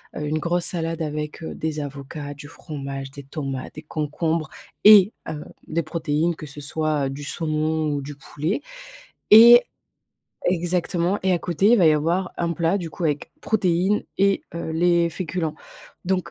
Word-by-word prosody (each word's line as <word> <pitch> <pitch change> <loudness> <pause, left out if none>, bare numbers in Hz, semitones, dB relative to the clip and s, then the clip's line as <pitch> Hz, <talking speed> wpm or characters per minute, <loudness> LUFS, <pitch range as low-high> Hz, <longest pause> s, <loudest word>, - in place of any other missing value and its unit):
heu, 150 - -4
une 155 +1 -1
grosse 175 +2 0
salade 165 -1 -2
avec, 150 +1 -5
heu, - - -5
des 155 -1 -3
avocats, 145 +1 -6
du 145 +1 -11
fromage, 140 -4 -7
des 140 - -9
tomates, 135 -2 -6
des 155 - -8
concombres 155 +1 -2 0.3
et, 210 -1 +8 0.2
heu, 150 -1 -6 0.2
des 165 +1 -1
protéines 160 +1 -1
que 155 - -9
ce 145 +1 -10
soit 150 -1 -1
du 140 +2 -7
saumon 155 0 -1
ou 145 - -2
du 145 +1 -8
poulet 155 - -3 0.7
et 235 +3 +10 0.9
exactement 175 +1 0
et 190 - +2
à 175 - +2
côté 175 +5 +1
il - - +7
va 175 - +5
y 155 - +6
avoir 170 +5 0
un 170 0 0
plat 170 +4 +1
du 170 -3 -5
coup 170 - -5
avec 150 -2 -1
protéines 195 -1 +1 0.2
et, 195 0 +3
heu, 165 -1 -4
les 170 +1 +3
féculents. 165 -2 -3 0.5
Donc 185 0 -1
160 Hz, 170 wpm, -23 LUFS, 150-175 Hz, 0.9 s, et